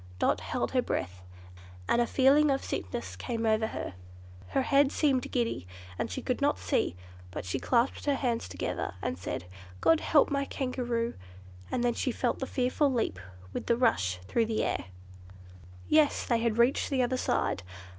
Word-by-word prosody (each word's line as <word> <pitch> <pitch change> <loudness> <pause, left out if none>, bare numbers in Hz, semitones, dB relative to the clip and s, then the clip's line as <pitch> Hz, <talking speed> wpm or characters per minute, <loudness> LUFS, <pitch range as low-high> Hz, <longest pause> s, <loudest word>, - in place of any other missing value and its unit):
Dot - - +2
held - - -2
her - - +3
breath, 90 0 -3 0.7
and 240 - +3
a 240 - +1
feeling 280 +4 +5
of 270 -1 +1
sickness 95 -1 -4
came 225 - -3
over 220 0 +2
her. 95 - -5 0.5
Her 270 - +1
head 280 +1 +4
seemed 270 -5 +1
giddy, 230 - -1 0.3
and - - -1
she - - -5
could - - -1
not - - +2
see, 85 - 0 0.3
but 90 - -6
she 90 - -2
clasped 245 +1 +1
her 285 -1 +2
hands 240 - -1
together 90 0 -3
and - - -1
said, 90 -1 -5 0.3
"God 325 - +4
help 295 -2 +3
my 280 0 +1
Kangaroo!" 245 -4 -2 0.6
and 245 - -1
then 240 -1 +2
she 255 - -1
felt 240 +1 -1
the 265 - -3
fearful 260 +3 +1
leap 225 - -1 0.3
with - - -4
the 235 - +3
rush 95 - +2
through 230 -2 +1
the 220 -1 0
air. - - -1 1.0
Yes! 305 -1 +3
they 235 -2 +2
had 230 -1 0
reached 240 +3 +3
the 260 -2 +2
other 245 +1 0
side. 250 - 0
240 Hz, 175 wpm, -29 LUFS, 220-270 Hz, 1.0 s, feeling